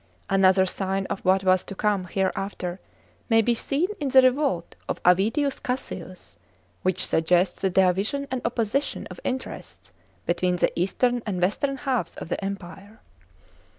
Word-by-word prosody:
An 195 0 +3
other 190 0 +5
sign 195 +1 -2
of - - -2
what 190 +1 +3
was 185 -1 +3
to 195 - -7
come 205 -2 0
hereafter 190 -1 -2 0.5
may 225 -1 +5
be 240 - +2
seen 280 +8 0
in 285 -2 -1
(3) 265 - +7
the 255 - +6
revolt 260 - -2
of - - -2
Avidius 220 - +2
Cassius, 185 - -6 0.4
which 185 0 +1
suggests 175 +3 +2
the 190 - +2
division 190 +9 +2
and 260 -1 -2
opposition 235 +4 -1
of - - -9
interests 260 0 -6 0.3
between 180 +1 +1
the 175 - +1
eastern 240 +7 +1
and 190 -4 -2
western 240 +10 0
halves 260 -8 -2
of - - -8
the 195 - -3
Empire. 195 +2 -7
195 Hz, 155 wpm, -25 LUFS, 185-245 Hz, 0.5 s, 3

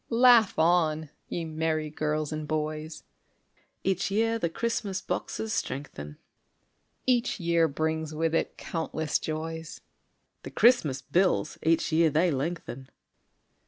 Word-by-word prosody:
_) - - -47
Laugh 235 -3 +5
on, 160 -2 +2 0.2
ye 170 - -3
merry 155 -1 -1
girls 155 0 -1
and 155 -1 -4
boys! 155 0 -3 0.8
(Each 190 -1 0
year 225 +3 +1
the 170 - 0
Christmas 205 -1 -2
boxes 220 +3 -3
strengthen,) 75 - -4 0.9
Each 245 -3 +1
year 170 -1 +3
brings 160 +1 -2
with 160 +1 -1
it - - -1
countless 160 -2 -2
joys; 160 +1 -5 0.6
(_The - - -9
Christmas 155 - +4
bills 180 0 +1
each 165 +1 +2
year 160 +1 +4
they 165 +4 +2
lengthen. 135 -2 -4
160 Hz, 125 wpm, -28 LUFS, 155-180 Hz, 0.9 s, Laugh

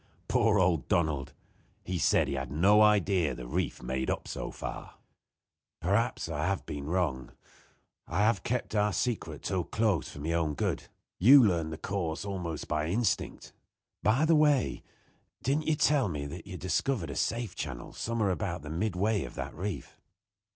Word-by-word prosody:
Poor 105 -1 +3
old 90 -7 +2
Donald! 75 -5 0 0.5
He 90 -1 -3
said - - +3
he - - -2
had 65 -1 -4
no 95 +8 +5
idea 95 -8 +3
the 60 - -7
reef - - -2
made 65 +1 -2
up - - -2
so - - -4
far. - - -7 0.8
"Perhaps 105 +6 0
I 75 -2 -3
have 100 0 -1
been 70 0 -5
wrong. 80 -7 -1 0.7
I 100 - 0
have 110 +2 +3
kept 125 -1 -2
our 105 -1 +2
secret 90 - -2
too 95 -3 -1
close 105 - 0
for - - -11
my 75 +4 -3
own 80 -3 0
good. - - -1 0.3
You 130 +7 +9
learned 85 -6 +1
the 80 - -5
course 90 -3 -3
almost 90 -6 -4
by 75 0 -1
instinct. 100 +4 -1 0.5
By 120 +8 +3
the 165 0 +4
way 150 -4 +3 0.6
didn't 145 +4 0
you 155 - +3
tell 145 -4 +3
me 75 -4 -4
that 85 +4 -8
you - - -8
had 90 - -7
discovered 95 +2 0
a - - -6
safe 115 -4 -1
channel 65 -6 -6
some 115 +1 -3
where 100 -3 +2
about 75 -3 -3
midway 95 +5 0
of - - -8
that - - -5
reef?" 95 +3 -5
90 Hz, 170 wpm, -30 LUFS, 80-110 Hz, 0.8 s, You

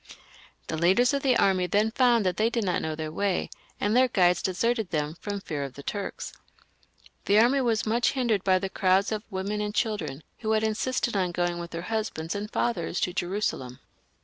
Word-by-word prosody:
The 160 - -4
leaders 190 - +3
of 280 - 0
the 260 -3 +3
army 185 -2 +2
then 210 +5 +2
found 240 -3 +3
that 185 - 0
they 220 +1 +3
did 235 -1 -1
not 180 -3 0
know 160 -1 -3
their 155 0 -5
way, 195 +2 -1 0.3
and 205 +2 +1
their 255 +1 +5
guides 180 -6 +3
deserted 220 +2 0
them 150 -1 -2
from 205 -1 -3
fear 150 -6 -4
of 135 -2 -7
the 140 - -10
Turks. 200 +4 -5 0.9
The 205 - +4
army 250 +5 +5
was 230 -3 +1
much 235 +2 +2
hindered 235 -7 0
by 190 -1 +4
the 195 +1 -2
crowds 190 +1 +2
of 215 -1 -1
women 200 +1 -3
and 210 0 -3
children 205 -10 -2 0.2
who 220 -1 0
had 220 0 +2
insisted 230 +2 -1
on 185 -3 +1
going 175 0 -1
with 170 0 -6
their 170 0 -6
husbands 210 -6 -3
and 205 +1 -4
fathers 185 -8 -1
to 180 - 0
Jerusalem. 175 -10 -2
200 Hz, 200 wpm, -27 LUFS, 175-225 Hz, 0.9 s, their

